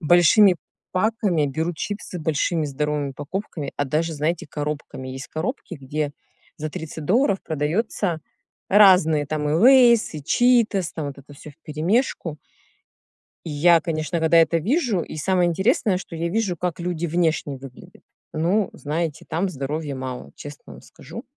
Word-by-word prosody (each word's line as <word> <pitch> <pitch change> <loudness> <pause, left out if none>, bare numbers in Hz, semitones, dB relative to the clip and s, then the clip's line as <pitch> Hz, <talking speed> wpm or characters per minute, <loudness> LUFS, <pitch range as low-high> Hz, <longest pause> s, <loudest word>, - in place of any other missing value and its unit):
большими 175 +4 +5 0.3
паками, 185 -5 +1
берут 160 +5 -2
чипсы 200 0 -5
большими 160 +1 0
здоровыми 150 0 -2
упаковками, 145 +1 -5
а 145 - 0
даже, 155 +4 -1
знаете, 155 +3 -2
коробками. 150 -3 -5
Есть 130 +1 -7
коробки, 185 - -4
где 145 +2 -3 0.5
за 155 - -4
30 155 0 -7
долларов 200 - +2
продаются 165 +4 -1 0.5
разные 180 -7 +6
там 150 0 -2
и - - 0
"Лейс", 235 - +5
и 150 - -6
"Читос", 230 - +2
там 155 -3 -4
вот 140 - -9
это 140 +1 -14
всё 150 +2 -12
вперемешку. 165 - -2 1.1
И 165 - -5
я, 165 +3 +4
конечно, 160 0 -2
когда 165 +1 +4
это 165 0 +4
вижу 225 - 0
И - - -8
самое 180 +2 +2
интересное, 190 - +1
что 175 -2 -9
я 170 +1 -2
вижу, 195 -1 -1
как 175 +1 -3
люди 175 -1 -2
внешне 160 -4 0
выглядят. 135 -1 -13 0.3
Ну, 180 +6 +1
знаете, 155 +1 -3
там 170 +5 -1
здоровья 145 -1 -4
мало, 130 -1 -6
честно 145 -1 -11
вам - - -14
скажу. - - -11
165 Hz, 150 wpm, -23 LUFS, 150-185 Hz, 1.1 s, разные